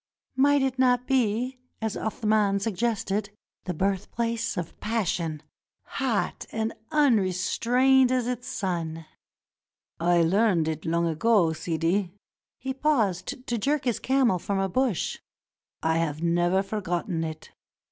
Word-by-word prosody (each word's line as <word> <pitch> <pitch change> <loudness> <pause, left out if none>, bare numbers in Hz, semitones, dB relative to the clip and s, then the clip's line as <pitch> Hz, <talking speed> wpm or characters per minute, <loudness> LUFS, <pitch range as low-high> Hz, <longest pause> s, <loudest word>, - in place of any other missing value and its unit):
Might 285 +1 +4
it 265 -1 -1
not 250 -1 +3
be, 255 0 0 0.2
as 220 -1 -2
Athman 210 -2 +1
sug 215 +2 -2
gested, 210 -1 -1 0.4
the 180 - -2
birthplace 205 +5 -1
of 170 -2 -5
passion 170 -8 -2 0.4
hot 255 -7 -2
and 220 0 -2 0.2
unrestrained 250 - +3
as 255 -2 +1
its 245 0 -3
sun? 165 -4 -3 0.9
"I 170 0 +3
learned 185 -2 +3
it 160 0 -3
long 170 +1 +1
ago, 170 +1 +3
Sidi," 165 +4 -1 0.3
— - - -68
he 265 0 -4
paused 250 - 0
to 240 - -1
jerk 285 +6 0
his 240 -3 0
camel 260 -8 +2
from 200 +3 -2
a 195 0 +1
bush; 245 -1 0 0.6
"I 160 0 +2
have 155 -1 -2
never 175 +3 +2
forgotten 180 -4 -2
it. 155 -1 -7
205 Hz, 130 wpm, -26 LUFS, 175-245 Hz, 0.9 s, Might